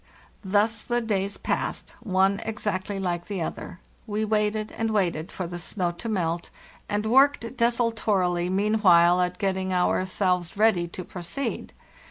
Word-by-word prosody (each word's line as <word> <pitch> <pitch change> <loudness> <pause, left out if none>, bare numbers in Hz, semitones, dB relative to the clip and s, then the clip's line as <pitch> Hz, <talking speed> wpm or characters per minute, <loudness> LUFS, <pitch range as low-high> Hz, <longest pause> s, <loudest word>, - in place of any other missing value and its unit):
Thus 210 +3 +1
the 240 0 0
days 200 -3 -1
passed - - -2
by, 225 - -9
one 195 +2 +3
exactly 210 -3 -3
like 175 -2 -2
the 195 -5 -2
other; 170 - -6 0.3
we 215 +1 -1
waited 215 0 0
and 225 0 -2
waited 180 -6 0
for 185 - -4
the 175 +1 -6
snow 175 0 -1
to 200 +7 -7
melt, 170 -4 -1 0.4
and 210 +1 -1
worked 260 0 +3
desultorily 220 -7 +1
meanwhile 185 -3 +4
at 180 0 -1
getting 190 -1 -1
ourselves 185 0 0
ready 210 -5 +3
to 180 +2 -7
pro 180 - -9
ceed. 275 +11 -4
195 Hz, 150 wpm, -26 LUFS, 180-220 Hz, 0.4 s, meanwhile